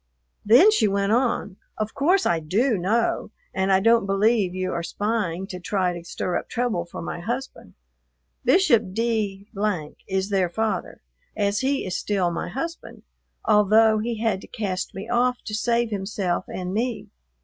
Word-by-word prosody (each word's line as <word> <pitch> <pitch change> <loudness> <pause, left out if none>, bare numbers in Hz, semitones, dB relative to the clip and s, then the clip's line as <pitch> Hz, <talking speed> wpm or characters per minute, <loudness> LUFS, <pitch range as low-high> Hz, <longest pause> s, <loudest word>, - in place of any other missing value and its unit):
Then 250 - +7
she 225 - +3
went 200 0 0
on, 235 -5 0 0.2
"Of 215 0 -3
course 360 +8 +2
I 170 - +2
do 215 - +1
know, 210 +7 0 0.2
and 190 +1 0
I 190 - +5
don't 230 0 +3
believe 195 -1 +2
you 185 0 -2
are 170 - -2
spying 195 -1 -2
to 185 -2 -7
try 180 -1 0
to 175 -1 -7
stir 175 +1 -2
up - - -12
trouble 235 -8 -1
for 170 - -8
my 170 - -5
husband. 245 +8 -5 0.7
Bishop 235 - +3
D 215 -3 -1 0.6
is 190 +1 -1
their 190 -3 +2
father, 220 - -3 0.3
as 205 -1 +1
he 270 +1 0
is 185 -1 -3
still 190 -4 0
my 170 - -4
husband, 330 +5 -6 0.4
although 215 +1 +5
he 230 +1 -2
had 220 -4 0
to - - -12
cast 195 -6 -4
me 195 +3 -6
off 245 +1 +2
to 210 - -5
save 235 +1 +1
himself 195 -3 -2
and 180 0 -5
me. 235 +2 -2
210 Hz, 165 wpm, -24 LUFS, 190-235 Hz, 0.7 s, Then